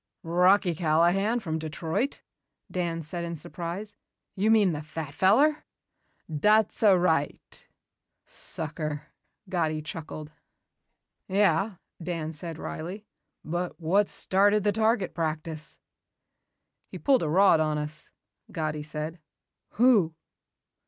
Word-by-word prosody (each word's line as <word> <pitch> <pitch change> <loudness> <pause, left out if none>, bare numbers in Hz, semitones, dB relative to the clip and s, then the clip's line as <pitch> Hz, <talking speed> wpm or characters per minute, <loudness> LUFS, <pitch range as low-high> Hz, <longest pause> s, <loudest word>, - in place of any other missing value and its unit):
"Rocky 180 +2 +4
Callahan 175 +8 +2
from 160 -5 -2
Detroit!" 160 - -2 0.5
Dan 170 -2 -2
said 170 +3 -4
in 170 0 -4
surprise. 170 +7 -5 0.4
"You 205 +3 +1
mean 215 -4 +5
the 150 - -4
fat 155 -1 -6
feller." 285 - +4 0.6
"Dat's 210 +7 +2
a'right." 180 -8 +2 0.6
"Sucker," 150 -1 -5 0.4
Gatti 160 -4 0
chuckled. 155 -1 -7 1.0
"Yeah," 195 +1 +2 0.3
Dan 165 -2 -3
said 165 +1 -6
wryly. 185 +7 -6 0.4
"But 175 +3 -3
what 190 +5 +2
started 205 +2 +2
the 205 - +3
target 220 -3 +1
practice?" 160 -1 -4 1.1
"He - - -8
pulled 270 -3 +3
a 155 - -1
rod 185 0 +5
on 155 -1 +1
us," 150 +1 -2 0.4
Gatti 155 -2 -2
said. 155 +2 -5 0.5
"Who?" 210 -9 +4
170 Hz, 105 wpm, -27 LUFS, 155-200 Hz, 1.1 s, mean